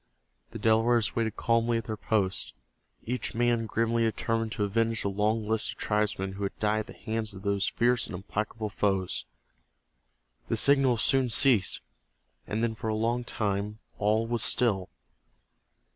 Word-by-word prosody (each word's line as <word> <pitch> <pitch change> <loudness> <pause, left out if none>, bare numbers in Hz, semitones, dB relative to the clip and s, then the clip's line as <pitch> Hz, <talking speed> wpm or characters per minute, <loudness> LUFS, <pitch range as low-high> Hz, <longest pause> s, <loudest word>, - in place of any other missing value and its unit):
The 115 - -7
Delawares 115 +1 +3
waited 115 -2 -1
calmly 115 0 +1
at 115 - -3
their 110 - -4
posts, 95 - -1 0.5
each 125 0 -3
man 120 -1 +1
grimly 115 +1 0
determined 115 0 0
to 105 - -1
avenge 115 +2 0
the 100 - 0
long 105 +2 0
list 110 0 +1
of - - -23
tribesmen 105 -2 -1
who 100 +1 -5
had 100 - -3
died 105 0 +1
at 110 - -5
the - - -10
hands 110 -2 -4
of 95 - -10
those 100 -1 0
fierce 120 0 +1
and - - -6
implacable 105 +3 -4
foes. 95 -10 -1 1.2
The - - 0
signals 135 -5 +4
soon 135 -2 +3
ceased, 115 -6 +3 0.7
and 110 +2 -1
then 115 -1 +1
for 110 - -6
a 110 - 0
long 115 +3 0
time 105 -2 -2 0.2
all 110 +2 +2
was 120 -1 -1
still. 100 -8 +1
110 Hz, 160 wpm, -28 LUFS, 105-115 Hz, 1.2 s, signals